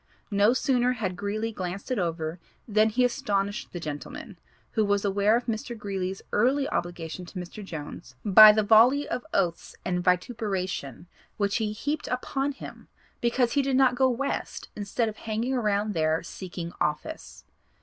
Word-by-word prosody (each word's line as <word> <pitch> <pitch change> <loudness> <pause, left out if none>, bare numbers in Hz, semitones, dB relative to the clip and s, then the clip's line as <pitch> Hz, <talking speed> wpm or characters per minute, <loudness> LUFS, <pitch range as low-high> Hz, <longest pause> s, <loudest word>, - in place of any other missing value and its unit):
No 205 +2 +4
sooner 255 -1 +2
had 200 -7 -3
Greeley 215 +4 -2
glanced 190 +3 -5
it 250 - +1
over 165 -1 -2 0.3
than 215 0 +3
he 250 +3 +2
astonished 205 -4 -1
the 175 - -5
gentleman, 150 -3 -7 0.3
who 220 - +1
was 205 0 +1
aware 200 +2 +3
of 245 - -4
Mr. 235 +1 -3
Greeley's 195 -2 -4
early 275 +3 +2
obligation 175 0 -4
to 180 - -10
Mr. 180 +4 -7
Jones, 150 -7 -8
by 215 +1 +10
the 215 0 +2
volley 235 +7 +5
of 250 - -3
oaths 175 -4 -1
and 180 -1 -1
vituperation 180 - -1 0.3
which 200 -1 +1
he 220 -3 -1
heaped 290 +8 -3
upon 270 +3 -1
him - - -11 0.3
because 240 0 +2
he 285 - +3
did 270 -1 0
not 260 -1 +5
go 260 +1 +3
West 265 +3 -3
instead 210 +3 -1
of 215 -1 -5
hanging 225 +4 -2
around 210 -3 0
there 160 -1 +1
seeking 175 -1 -7
office. 150 - -3
210 Hz, 160 wpm, -27 LUFS, 180-245 Hz, 0.3 s, by